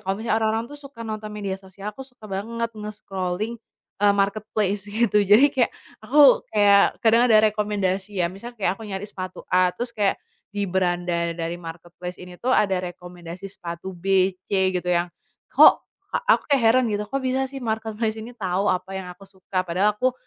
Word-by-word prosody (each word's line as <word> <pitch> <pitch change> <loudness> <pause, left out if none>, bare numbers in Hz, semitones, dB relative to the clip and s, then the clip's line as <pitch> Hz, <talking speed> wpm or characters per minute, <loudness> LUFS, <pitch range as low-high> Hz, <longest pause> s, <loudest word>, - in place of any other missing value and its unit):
kalo 195 +1 -2
misalnya 220 0 0
orang-orang 220 +1 0
tuh 290 - -11
suka 270 -5 -10
nonton 215 -1 -5
media 200 -2 -5
sosial, 195 +2 -8
aku 270 - -13
suka 250 -4 -20
banget 230 +4 -4
nge-scrolling, 210 0 -4 0.4
eee, 205 0 +4
marketplace, 200 0 -1
gitu. 210 0 +2
Jadi 215 +9 +6
kayak 260 -4 +1 0.3
aku 280 +2 +6
kayak 200 -1 +4
kadang 230 +2 +5
ada 220 -2 +6
rekomendasi 205 -2 -2
ya 170 - +1
misalnya 235 +6 -9
kayak 185 - +2
aku - - -10
nyari 195 -1 -5
sepatu 185 -2 -7
A, 180 0 +3
terus 240 +5 -4
kayak 205 -4 +1 0.4
di 205 0 -2
beranda 175 -2 0
dari 170 +1 -4
marketplace 175 +1 -9
ini 180 0 -11
tuh 255 +2 0
ada 195 -2 +2 0.2
rekomendasi 175 +1 -10
sepatu 170 0 -7
B, 190 +1 +2 0.2
C, 190 -1 +2
gitu 180 - -9
yang 175 0 +1 0.4
kok - - +7 0.3
ka - - +1
aku - - +4 0.2
heran 235 +2 +4
gitu, 205 0 -1
"Kok 275 - -1
bisa 260 +1 0
sih 275 - -9
marketplace 220 -1 -2
ini 225 +3 -8
tau 190 -1 0
apa 185 +1 -2
yang 190 -1 -5
aku 180 +2 -13
suka?" 190 -1 -4
Padahal 195 +5 +1
aku, 255 +2 +1
200 Hz, 180 wpm, -23 LUFS, 185-220 Hz, 0.4 s, kok